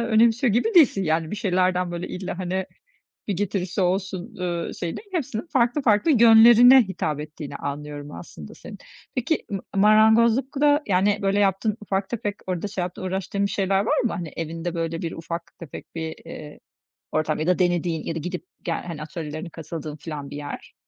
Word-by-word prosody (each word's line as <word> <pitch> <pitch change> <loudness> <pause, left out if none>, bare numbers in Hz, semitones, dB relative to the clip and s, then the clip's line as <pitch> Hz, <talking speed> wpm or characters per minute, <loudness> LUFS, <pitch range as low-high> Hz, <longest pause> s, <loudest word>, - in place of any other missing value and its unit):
önemsiyor 230 +1 +3
gibi 310 - +1
değilsin. 275 - +6
Yani, 160 0 0
bir 210 - -4
şeylerden, 185 -3 +1
böyle, 175 0 -5
"İlla, 185 -1 -5
hani, 185 0 -2 0.6
bir 205 - +1
getirisi 195 -1 -2
olsun." 185 0 -1
eee, 175 -2 -3
şeyi 170 -1 -3
değil 410 - -11
hepsinin 275 -6 -3
farklı 255 0 +1
farklı 220 +7 +3
yönlerine 235 +1 +8
hitap 155 -7 -3
ettiğini 150 -2 -7
anlıyorum 145 +1 -6
aslında - - -10
senin. - - -11 0.4
Peki 260 +5 -1
mı 195 -2 -2 0.2
marangozlukta, 235 +8 +4
yani, 200 +2 +2
böyle, 195 +1 +1
yaptığın 200 +2 +1
ufak 195 -1 -2
tefek 210 -4 -3
orada 185 +2 -2
şey 195 -3 -3
yaptığın 180 +1 -5
uğraştığın 190 +2 -2
bir - - -4
şeyler 195 -1 +1
var - - +1
mı? 235 - 0
Hani, 170 -1 -4
evinde, 165 +1 -4
böyle, 165 0 -3
bir 165 - -3
ufak 170 +1 -7
tefek 165 -4 -10
bir, 160 -1 -4
eee, 150 -1 -9 0.5
ortam 155 0 0
ya 155 - -2
da 180 +1 +2
denediğin 175 -3 0
ya 165 - -3
da - - -3
gidip 180 +3 -5 0.2
gel - - -3
hani, 165 -4 -6
atölyelerine 155 +1 -6
katıldığın 155 -1 -7
falan 145 -2 -7
bir 145 - -7
yer? 145 -1 -7
185 Hz, 180 wpm, -24 LUFS, 165-215 Hz, 0.6 s, yönlerine